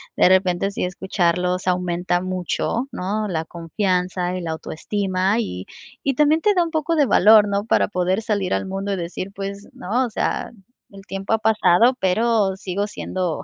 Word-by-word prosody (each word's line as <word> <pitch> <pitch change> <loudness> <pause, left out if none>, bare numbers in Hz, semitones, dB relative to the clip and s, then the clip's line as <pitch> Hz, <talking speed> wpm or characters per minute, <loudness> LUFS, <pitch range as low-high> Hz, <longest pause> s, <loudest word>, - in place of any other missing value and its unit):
de - - +5
repente, 185 +1 +2
sí 200 - -2
escucharlos, 180 0 -1
aumenta 180 0 0
mucho, 185 +7 -2
¿no?, 210 +4 -2
la 165 -5 -2
confianza, 180 +1 -2
el 180 -2 -4
autoestima, 185 +5 -1
y 95 - -5 0.4
y 275 - +1
también 300 +3 +4
te 415 +5 +3
da 360 -3 +3
un 335 - -5
poco 320 +1 0
de 295 -3 +4
valor, 210 -2 +6
¿no?, 200 +1 -1
para 225 - +2
poder 185 +1 0
salir 205 -4 -1
al - - -1
mundo 195 +1 -3
y - - 0
decir: 180 +1 -5
"Pues, 200 +1 -6
¿no?, 240 +8 -1
o - - -5
sea, - - -2 0.4
el 195 -1 -13
tiempo 195 +2 -3
ha - - +4
pasado, 220 +2 +3
pero 205 +1 +2
sigo 195 +2 -3
siendo 185 -5 -3
195 Hz, 175 wpm, -21 LUFS, 180-215 Hz, 0.4 s, valor